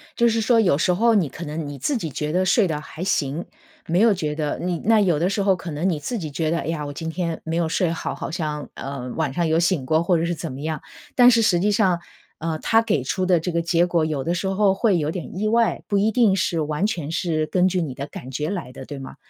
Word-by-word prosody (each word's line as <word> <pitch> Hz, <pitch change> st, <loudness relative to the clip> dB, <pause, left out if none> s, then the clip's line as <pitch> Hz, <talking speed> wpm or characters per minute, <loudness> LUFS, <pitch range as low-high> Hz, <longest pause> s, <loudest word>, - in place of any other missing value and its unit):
就 235 Hz, -, +3 dB
是 230 Hz, -1 st, +1 dB
说 230 Hz, +1 st, +4 dB
有 185 Hz, -9 st, +4 dB
时 180 Hz, -, +2 dB
候 230 Hz, +5 st, +3 dB
你 185 Hz, -9 st, +2 dB
可 165 Hz, +6 st, -8 dB
能 155 Hz, 0 st, -4 dB
你 145 Hz, -1 st, -7 dB
自 255 Hz, -, 0 dB
己 165 Hz, -8 st, -4 dB
觉 150 Hz, +2 st, -3 dB
得 185 Hz, +3 st, +1 dB
睡 195 Hz, +2 st, +3 dB
得 150 Hz, -3 st, -3 dB
还 160 Hz, +3 st, -8 dB
行， 150 Hz, -3 st, -1 dB, 0.4 s
没 170 Hz, +2 st, +1 dB
有 225 Hz, +2 st, +6 dB
觉 155 Hz, -6 st, -1 dB
得 150 Hz, -1 st, -2 dB
你 175 Hz, -1 st, -2 dB
那 225 Hz, 0 st, +4 dB
有 175 Hz, -7 st, +2 dB
的 175 Hz, +3 st, +1 dB
时 200 Hz, 0 st, 0 dB
候 195 Hz, -1 st, +3 dB
可 170 Hz, -1 st, -8 dB
能 155 Hz, +4 st, -1 dB
你 165 Hz, -5 st, 0 dB
自 230 Hz, -, -3 dB
己 160 Hz, -7 st, -5 dB
觉 155 Hz, +3 st, -1 dB
得， 170 Hz, -, +1 dB
哎 -, -, -5 dB
呀， 160 Hz, -2 st, -2 dB
我 -, -, -5 dB
今 160 Hz, +3 st, -5 dB
天 170 Hz, -1 st, -3 dB
没 160 Hz, 0 st, -3 dB
有 170 Hz, -1 st, 0 dB
睡 170 Hz, +1 st, +1 dB
好， 165 Hz, -, -3 dB
好 -, -, -5 dB
像， 150 Hz, -3 st, -3 dB
呃， 135 Hz, -2 st, -6 dB
晚 155 Hz, -4 st, -1 dB
上 170 Hz, +4 st, 0 dB
有 160 Hz, +1 st, +2 dB
醒 170 Hz, -5 st, +1 dB
过 155 Hz, +4 st, +2 dB
或 170 Hz, +1 st, +2 dB
者 165 Hz, -, 0 dB
是 170 Hz, -, -1 dB
怎 165 Hz, -2 st, -5 dB
么 130 Hz, +2 st, -7 dB
样。 155 Hz, -1 st, -3 dB, 0.3 s
但 245 Hz, -1 st, +8 dB
是 230 Hz, -2 st, +4 dB
实 175 Hz, -5 st, +3 dB
际 205 Hz, +4 st, +2 dB
上， 190 Hz, -4 st, +2 dB, 0.4 s
呃， 160 Hz, 0 st, -2 dB
它 225 Hz, +7 st, +3 dB
给 155 Hz, -, 0 dB
出 185 Hz, +8 st, -1 dB
的 180 Hz, -2 st, +4 dB
这 175 Hz, +3 st, -3 dB
个 170 Hz, 0 st, 0 dB
结 170 Hz, +1 st, +2 dB
果 170 Hz, -2 st, +1 dB
有 150 Hz, -4 st, -1 dB
的 170 Hz, -, 0 dB
时 185 Hz, +2 st, -2 dB
候 195 Hz, 0 st, +3 dB
会 195 Hz, -3 st, +2 dB
有 155 Hz, 0 st, -1 dB
点 180 Hz, 0 st, -6 dB
意 215 Hz, +2 st, 0 dB
外， 230 Hz, +1 st, +2 dB
不 200 Hz, -2 st, +1 dB
一 215 Hz, +2 st, +2 dB
定 225 Hz, -5 st, +4 dB
是 180 Hz, -3 st, 0 dB
完 150 Hz, +7 st, 0 dB
全 165 Hz, -8 st, -4 dB
是 160 Hz, -3 st, 0 dB
根 180 Hz, +3 st, +2 dB
据 185 Hz, -1 st, 0 dB
你 140 Hz, -5 st, -4 dB
的 140 Hz, +2 st, -6 dB
感 130 Hz, -3 st, -9 dB
觉 150 Hz, +5 st, -2 dB
来 175 Hz, -11 st, -4 dB
的， 135 Hz, -, -9 dB
对 145 Hz, -, -7 dB
吗？ 135 Hz, -, -9 dB
170 Hz, 305 characters per minute, -23 LUFS, 155-190 Hz, 0.4 s, 但